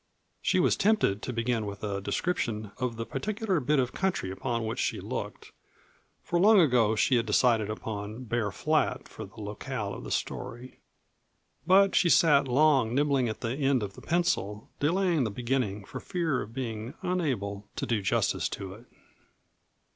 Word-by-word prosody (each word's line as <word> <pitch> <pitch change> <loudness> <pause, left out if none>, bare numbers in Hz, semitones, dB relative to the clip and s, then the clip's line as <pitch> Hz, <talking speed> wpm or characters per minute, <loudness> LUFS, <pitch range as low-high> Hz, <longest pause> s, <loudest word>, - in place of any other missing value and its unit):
She - - +2
was - - +3
tempted 195 - +2
to - - -4
begin 115 -2 -1
with 100 0 -7
a 100 -2 -2
description 110 - -2
of 125 -2 -1
the 115 0 -4
particular 210 - -1
bit 145 +2 +1
of 125 -2 0
country 185 - -1
upon 115 +4 -2
which 110 - -3
she - - -1
looked, - - -6 0.7
for 175 - 0
long 210 +3 +7
ago 120 - +4
she 125 +3 +3
had 115 0 -1
decided 110 -1 +3
upon 110 +2 -5
Bear 115 -2 -1
Flat - - 0
for - - -8
the - - -15
locale 105 +1 -4
of - - -8
the - - -7
story. 120 +2 -4 0.9
But 195 +1 +6
she 175 - +4
sat 145 -5 +5
long 130 -3 +3
nibbling 140 -4 +2
at 110 - -6
the 115 - -2
end 135 -4 +1
of 100 -1 -5
the - - -12
pencil, 135 - -1
delaying 170 0 +2
the 110 - -1
beginning 115 -3 -2
for - - -7
fear 165 -7 -1
of 110 - -7
being 115 +1 -5
unable 110 - -2
to - - -2
do 115 -4 0
justice 95 - +1
to 95 -1 -6
it. 115 +5 -14
120 Hz, 170 wpm, -28 LUFS, 105-150 Hz, 0.9 s, long